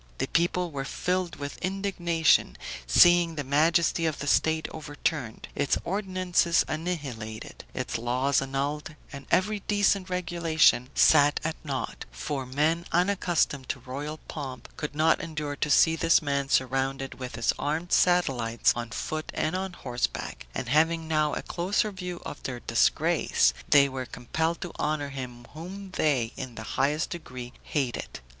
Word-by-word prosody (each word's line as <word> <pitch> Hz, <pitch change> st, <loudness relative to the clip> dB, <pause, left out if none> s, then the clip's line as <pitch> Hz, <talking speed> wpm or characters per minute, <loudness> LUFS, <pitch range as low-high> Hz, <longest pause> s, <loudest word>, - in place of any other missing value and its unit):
The -, -, 0 dB
people 175 Hz, +1 st, 0 dB
were 140 Hz, -2 st, -3 dB
filled 180 Hz, +5 st, -2 dB
with 140 Hz, -1 st, -6 dB
indignation, 180 Hz, -4 st, +1 dB, 0.3 s
seeing 175 Hz, -, +6 dB
the 145 Hz, -, -2 dB
majesty 165 Hz, +4 st, +2 dB
of 155 Hz, -, -2 dB
the -, -, -5 dB
state 160 Hz, +2 st, +2 dB
overturned, 145 Hz, -5 st, -3 dB
its 145 Hz, -, +1 dB
ordinances 185 Hz, -2 st, +1 dB
annihilated, 140 Hz, -10 st, -5 dB
its -, -, -3 dB
laws 125 Hz, +4 st, +1 dB
annulled, 140 Hz, +3 st, -3 dB, 0.2 s
and 140 Hz, -1 st, -9 dB
every 210 Hz, +3 st, +2 dB
decent 205 Hz, -2 st, +2 dB
regulation 165 Hz, -7 st, +2 dB
set 145 Hz, -1 st, +5 dB
at 160 Hz, 0 st, -1 dB
naught; 135 Hz, -5 st, -4 dB
for 130 Hz, -, -4 dB
men 155 Hz, +6 st, +1 dB
unaccustomed 175 Hz, -7 st, +1 dB
to 135 Hz, -, -2 dB
royal 140 Hz, +5 st, -5 dB
pomp 135 Hz, -4 st, -7 dB
could 150 Hz, -1 st, -5 dB
not 155 Hz, +2 st, +3 dB
endure 150 Hz, -3 st, -4 dB
to 150 Hz, -, -1 dB
see 160 Hz, +3 st, +5 dB
this 165 Hz, +1 st, +4 dB
man 140 Hz, -3 st, -1 dB
surrounded 135 Hz, +1 st, 0 dB
with 125 Hz, -2 st, -6 dB
his 115 Hz, -1 st, +1 dB
armed 160 Hz, +4 st, -2 dB
satellites 130 Hz, -11 st, +3 dB
on 120 Hz, -1 st, -4 dB
foot 155 Hz, +6 st, -4 dB
and 160 Hz, +4 st, 0 dB
on 190 Hz, 0 st, -3 dB
horseback; 120 Hz, -, -3 dB
and 130 Hz, -, -3 dB
having 160 Hz, +4 st, +2 dB
now 155 Hz, -1 st, +1 dB
a -, -, -4 dB
closer 195 Hz, +4 st, 0 dB
view 180 Hz, -2 st, -6 dB
of -, -, -7 dB
their 125 Hz, -2 st, -5 dB
disgrace, -, -, +2 dB, 0.2 s
they 140 Hz, -1 st, +7 dB
were 130 Hz, -2 st, -5 dB
compelled 160 Hz, +8 st, -2 dB
to 175 Hz, -, -5 dB
honor 150 Hz, -1 st, -1 dB
him 125 Hz, -3 st, -7 dB
whom 185 Hz, +5 st, -8 dB
they 135 Hz, -9 st, +1 dB
in 130 Hz, -3 st, -6 dB
the 110 Hz, -, -6 dB
highest 150 Hz, +3 st, +1 dB
degree 130 Hz, -7 st, -7 dB
hated. 135 Hz, -6 st, -3 dB
150 Hz, 150 wpm, -27 LUFS, 135-170 Hz, 0.3 s, they